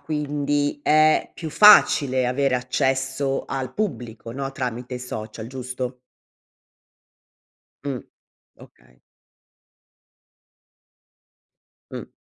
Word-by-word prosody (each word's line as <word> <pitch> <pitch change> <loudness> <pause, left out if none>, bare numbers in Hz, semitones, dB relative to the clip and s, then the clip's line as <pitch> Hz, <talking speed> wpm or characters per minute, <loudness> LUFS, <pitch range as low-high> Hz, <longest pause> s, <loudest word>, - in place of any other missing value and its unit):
quindi, 145 -1 -1
è 155 0 +4
più 160 -2 -6
facile 140 -10 +6
avere 135 +1 +1
accesso 135 +2 -1
al 130 -1 -5
pubblico 120 - -4
no, 135 +2 -5
tramite 125 -1 -4
social 110 -2 -7
giusto? 125 -1 -5 1.9
Mh, 135 -3 -4 0.6
okay. 60 0 -20 2.9
Mh. - - -7
135 Hz, 75 wpm, -23 LUFS, 125-145 Hz, 2.9 s, facile